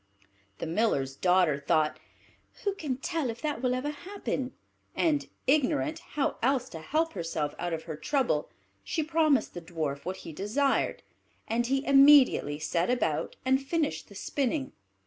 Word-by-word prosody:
The - - -4
Miller's 160 -7 0
daughter 180 -4 +3
thought, 155 +2 +1 0.6
"Who 400 - +1
can 295 -9 -3
tell 305 0 -2
if 230 +1 -5
that 295 -6 -2
will 250 -1 +1
ever 275 +4 -2
happen?" 295 -5 -4 0.4
and, 300 -4 +1 0.2
ignorant 305 +3 +2
how 290 - 0
else 255 0 +1
to 160 - -8
help 315 - 0
herself 165 -5 -2
out 175 0 -2
of 160 -1 -3
her 160 -2 -6
trouble, 235 - 0 0.3
she 320 - -1
promised 310 -5 +2
the 175 - -6
Dwarf 155 -5 -4
what 185 +2 -4
he 165 - -7
desired; 225 - 0 0.4
and 235 +1 0
he 270 +2 0
immediately 275 - +6
set 170 +5 0
about 250 - 0
and 265 +1 +3
finished 305 +1 -1
the - - -13
spinning. 275 0 -1
255 Hz, 155 wpm, -29 LUFS, -, 0.6 s, immediately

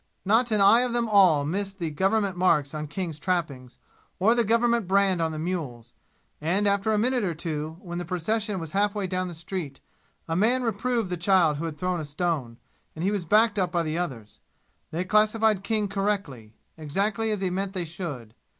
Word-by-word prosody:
Not 225 +5 +3
an 215 -2 +2
eye 200 +4 +7
of 250 -1 -1
them 240 -1 0
all 185 -9 +5
missed 195 +5 -3
the 165 -4 -3
government 195 +4 +1
marks 155 -6 +2
on 155 0 -4
King's 160 0 -5
trappings, 145 -9 -3 0.4
or 210 +5 +4
the 240 0 +2
government 230 -1 +2
brand 190 -2 +2
on 160 -1 0
the 155 - -5
mules, 150 -9 -4 0.5
and 190 +7 +1
after 200 +2 +1
a 215 - +2
minute 245 +2 +1
or 175 -4 -1
two, 155 0 -4
when 175 -2 -6
the - - -3
procession 200 +4 -2
was 165 -2 -7
half 205 +1 +1
way 205 -2 -1
down 185 0 -2
the 175 - -7
street, 165 -4 -6 0.5
a 165 - -2
man 240 +7 +2
reproved 230 -2 -1
the 180 - -1
child 170 -4 +3
who 165 - -4
had 160 -2 -5
thrown 180 +2 -1
a 155 - -4
stone, 145 -6 -2 0.4
and 160 - -5
he 195 - +1
was 200 -4 -2
backed 215 +4 +3
up 180 -2 0
by 170 -1 +1
the 155 0 -3
others. 125 -12 -5 0.5
They 170 +3 -2
classified 215 0 +2
King 210 0 0
correctly, 195 - -3 0.2
exactly 200 +9 -1
as 210 -2 -2
he 185 -2 0
meant 195 +1 -2
they 180 -3 -2
should. 150 - -7
185 Hz, 205 wpm, -26 LUFS, 160-210 Hz, 0.5 s, eye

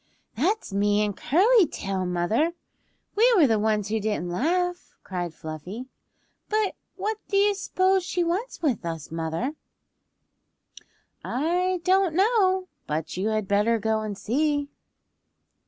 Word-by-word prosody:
"That's 360 - 0
me 205 +1 +2
and 205 -2 -3
Curly 390 - +4
Tail, 190 -5 -3
mother! 180 - +1 0.6
We 475 +4 +5
were 345 -7 +6
the 225 -4 +2
ones 210 -1 0
who 220 +1 0
didn't 205 -5 -2
laugh," 355 - -1
cried 175 -3 -4
Fluffy. 170 - -8 0.6
"But 430 -2 +1 0.2
what 425 +3 -2
do 395 - 0
you 405 +1 +4
s'pose 380 -1 +1
she 355 0 -1
wants 360 +6 -3
with 260 - +1
us, 165 -3 -5
mother?" 165 - -2 1.7
"I 355 +6 0
don't 375 -3 +3
know, 380 -2 +3 0.2
but 155 +1 -3
you 190 +4 -1
had 215 -2 -1
better 210 +4 +3
go 220 0 0
and 210 -2 -4
see." 290 +5 0
260 Hz, 135 wpm, -25 LUFS, -, 1.7 s, were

